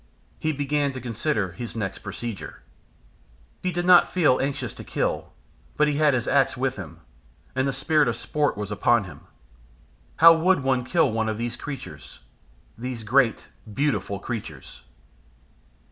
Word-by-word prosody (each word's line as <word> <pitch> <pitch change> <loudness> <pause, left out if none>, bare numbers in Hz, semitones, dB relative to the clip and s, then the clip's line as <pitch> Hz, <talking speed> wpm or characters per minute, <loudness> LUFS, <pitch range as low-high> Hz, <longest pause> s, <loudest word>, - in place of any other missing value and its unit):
He 155 - 0
began 145 -1 -1
to 130 - -6
consider 115 - -2
his 115 +7 -7
next 105 -4 -3
procedure. 115 -4 -7 1.0
He 185 - -1
did 175 0 -2
not 180 -1 +6
feel 160 -8 +3
anxious 135 -4 -3
to - - -10
kill, - - -2 0.5
but 150 - +4
he 145 -1 0
had 150 -3 +4
his 120 - -2
axe - - +2
with - - -1
him, - - -9 0.5
and 130 +1 +1
the - - +1
spirit 145 +2 +2
of 120 - 0
sport 145 +1 -1
was 105 0 -5
upon 105 +2 +3
him. 90 -7 -11 1.0
How 165 +1 +9
would 165 -2 +2
one 130 -2 +1
kill 160 -2 +2
one 110 0 -1
of 110 - -3
these 120 +1 -3
creatures? 145 +2 -9 0.5
these 120 0 -6
great 120 +2 +2 0.2
beautiful 105 -6 -1
creatures! 100 - -7
130 Hz, 155 wpm, -25 LUFS, 115-150 Hz, 1.0 s, How